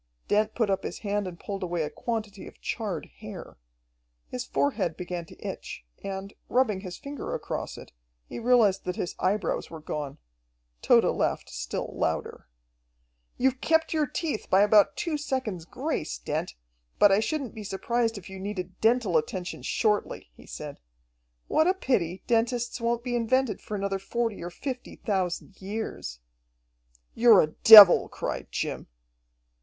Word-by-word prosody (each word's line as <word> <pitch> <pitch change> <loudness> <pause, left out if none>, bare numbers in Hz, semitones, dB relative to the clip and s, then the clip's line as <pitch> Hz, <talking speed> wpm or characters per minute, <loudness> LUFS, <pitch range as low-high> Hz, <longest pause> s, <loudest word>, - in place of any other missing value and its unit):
Dent 215 +1 +1
put 225 -4 +1
up 195 0 0
his - - -5
hand 205 -1 -1
and 175 -2 -8
pulled 200 -1 -5
away 175 -3 -1
a 150 - -3
quantity 215 -4 -4
of - - -14
charred 205 -8 -3
hair. - - -9 0.7
His 250 -1 -3
forehead 225 - -1
began 175 -1 -5
to - - -16
itch, - - -7 0.2
and, 195 0 -5 0.2
rubbing 240 -6 +2
his 185 -2 -7
finger 285 0 -5
across - - -5
it, - - -12 0.4
he - - -7
realized 230 -5 +3
that 180 0 -2
his 175 - -3
eyebrows 190 -1 0
were 165 - -8
gone. 150 -2 -5 0.6
Tode - - +5
laughed - - -1
still - - -4
louder. - - -2 0.9
"You've 260 +1 +1
kept 320 0 +2
your 305 -2 +1
teeth 300 -4 -3
by 190 - +5
about 210 -1 +5
two 315 -3 -2
seconds' 255 - -3
grace, 260 - -3
Dent, - - -3 0.4
but 205 - +6
I 195 - +5
shouldn't 275 +2 -2
be 220 -2 -8
surprised 225 +3 -1
if 190 - -10
you 190 0 -9
needed 190 -2 -6
dental 225 -6 +3
attention 180 +3 -3
shortly," 210 - -1
he - - -17
said. - - -8 0.7
"What 315 - +3
a 370 - +3
pity 190 - -1
dentists 240 +1 0
won't 235 0 0
be 245 -1 -2
invented 240 -1 +1
for 210 - -5
another 195 -1 -2
forty 230 +2 -2
or 175 - -5
fifty 250 +8 -6
thousand 190 -1 -3
years." 190 - -5 0.9
"You're 230 -4 +7
a 155 - -1
devil!" 210 -4 +11
cried - - -4
Jim. - - -3
210 Hz, 155 wpm, -27 LUFS, 185-240 Hz, 0.9 s, devil